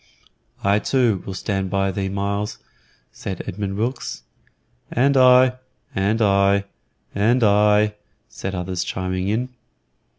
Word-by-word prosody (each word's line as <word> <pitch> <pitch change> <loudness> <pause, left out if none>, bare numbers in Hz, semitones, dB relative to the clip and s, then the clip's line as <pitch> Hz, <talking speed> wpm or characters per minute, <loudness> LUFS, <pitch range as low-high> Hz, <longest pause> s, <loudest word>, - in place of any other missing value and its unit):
"I 100 +1 +3
too 115 -5 +1
will 95 - -5
stand 95 0 -2
thee - - -7
by, 95 0 -1
Myles," 100 +1 -2 0.5
said 95 -3 -6
Edmund 95 +1 -4
Wilkes. 120 - -3 0.7
"And 135 +3 +2
I, 130 0 +6 0.4
and 105 +4 +1
I, 100 0 +3 0.5
and 115 +5 +2
I," 105 0 +4 0.3
said 95 0 -6
others, 90 0 -3
chiming 95 0 -3
in. 115 +5 -1
100 Hz, 120 wpm, -21 LUFS, 95-115 Hz, 0.7 s, I